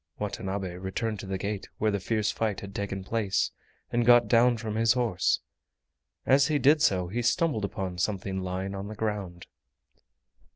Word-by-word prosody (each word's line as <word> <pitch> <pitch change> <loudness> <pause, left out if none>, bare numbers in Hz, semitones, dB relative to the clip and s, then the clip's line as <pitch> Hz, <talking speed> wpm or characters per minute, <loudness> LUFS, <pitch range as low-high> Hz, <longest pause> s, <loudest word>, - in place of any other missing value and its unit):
Watanabe 95 -3 -4
returned 100 +3 -3
to - - -7
the 95 0 -2
gate 100 +1 -4
where 110 0 +1
the 100 - -1
fierce 105 +1 0
fight 110 -4 -2
had 100 0 -8
taken 100 -1 -4
place, 105 -1 0 0.4
and 120 0 +2
got 120 -1 +6
down 120 +2 +4
from 110 -2 -4
his 115 +1 +3
horse. 115 -8 +1 0.8
As 135 +1 +5
he 155 - +2
did 145 +3 +4
so 90 - +2
he 115 +7 -2
stumbled 120 - +1
upon 95 -2 -4
something 95 0 -1
lying 95 +1 -3
on 100 +1 -5
the 110 - -7
ground. 100 -5 -3
105 Hz, 170 wpm, -28 LUFS, 95-115 Hz, 0.8 s, got